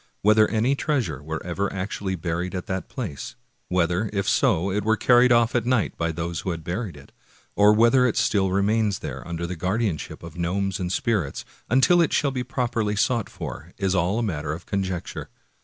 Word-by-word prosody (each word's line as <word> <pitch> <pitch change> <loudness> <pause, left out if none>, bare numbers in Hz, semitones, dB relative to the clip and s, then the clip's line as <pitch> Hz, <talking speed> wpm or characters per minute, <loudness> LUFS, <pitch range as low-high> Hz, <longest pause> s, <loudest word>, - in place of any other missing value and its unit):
Whether 110 +1 +5
any 115 +5 +2
treasure 125 - -1
were 80 +1 -5
ever 95 +3 -2
actually 95 0 -3
buried 85 +2 -3
at 90 - -4
that 95 0 -4
place; 100 - -6 0.3
whether, 90 +3 +1
if 100 -1 -2
so, 100 -8 +2
it 105 +1 -1
were 110 +1 +2
carried 125 +2 +5
off 120 0 +4
at 120 - +1
night 125 -5 +1
by 85 0 -1
those 85 +1 -3
who - - -4
had 85 -2 -4
buried 90 0 -4
it; 70 - -15 0.4
or 105 +1 +6
whether 120 +4 +5
it 115 - -1
still 95 -3 +2
re 100 +1 +1
mains 105 -1 +1
there - - -5
under 85 0 -3
the 90 +1 -4
guardianship 95 -1 -2
of 85 -2 -9
gnomes 95 +2 -1
and 90 -1 -2
spirits 95 - -1 0.2
until 135 +8 +5
it 165 - +1
shall 140 -2 +2
be 130 -2 -2
properly 120 -4 -1
sought 120 -1 +1
for, - - -8
is 95 -1 0
all 95 +5 +1
matter 75 -7 -2
of 85 +3 -8
conjec 95 -3 -2
ture. - - -8
100 Hz, 200 wpm, -24 LUFS, 85-115 Hz, 0.4 s, or